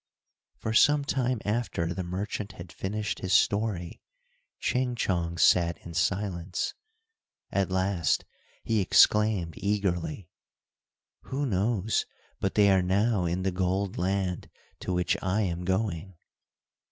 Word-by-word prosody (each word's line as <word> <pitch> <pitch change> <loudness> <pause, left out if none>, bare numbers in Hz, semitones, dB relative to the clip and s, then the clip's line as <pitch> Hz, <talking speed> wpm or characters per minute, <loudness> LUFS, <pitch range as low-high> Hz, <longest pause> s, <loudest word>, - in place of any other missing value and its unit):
For 110 - -3
some 145 +5 +5
time 130 -3 0
after 105 -6 -1
the 95 - -4
merchant 100 +3 -4
had 85 -1 -10
finished 105 +3 -3
his 95 0 -2
story, 100 -4 +1 0.6
Ching 125 -1 0
Chong 85 -6 -1
sat 85 +2 +4
in 85 - -8
silence. 90 0 -1 0.8
At 100 -1 +1
last 95 -4 +1 0.4
he 110 -2 +1
exclaimed, 100 -3 +4
eagerly, 95 -4 -1 1.0
"who 140 +2 -2
knows 110 -1 0 0.3
but 95 - -1
they 100 -1 +5
are 95 -1 +4
now 100 +2 +1
in 90 +2 -1
the 95 - +1
gold 95 +2 -1
land 95 0 -1 0.3
to - - -4
which 90 0 +1
I 95 +3 0
am 90 -3 -2
going." 95 -1 -1
95 Hz, 125 wpm, -28 LUFS, 90-105 Hz, 1.0 s, some